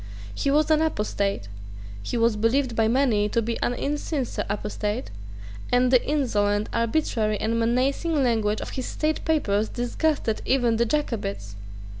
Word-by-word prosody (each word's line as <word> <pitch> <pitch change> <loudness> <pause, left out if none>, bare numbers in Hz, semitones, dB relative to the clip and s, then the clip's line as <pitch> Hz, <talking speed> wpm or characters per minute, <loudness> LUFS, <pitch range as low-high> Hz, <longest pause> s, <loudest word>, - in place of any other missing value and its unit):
He 280 - -1
was 300 +2 +3
an 310 0 +4
apostate: 205 - -1 0.5
he 240 - -3
was 230 -1 +3
believed 230 +3 +1
by 225 -1 +3
many 225 -4 +2
to 230 - +1
be 230 +1 -2
an 245 - 0
insincere 290 -1 -2
apostate; 210 +2 -3 0.6
and 250 0 +3
the 255 -2 +5
insolent, 210 -8 0
arbitrary 230 -3 0
and 230 +1 0
menacing 270 +6 +1
language 220 -3 +1
of - - -6
his 260 - -4
state 310 0 -1
papers 220 -10 +1
disgusted 245 -1 -1
even 245 -4 +2
the 235 +1 +2
Jacobites. 100 - -2
235 Hz, 145 wpm, -25 LUFS, 215-275 Hz, 0.6 s, the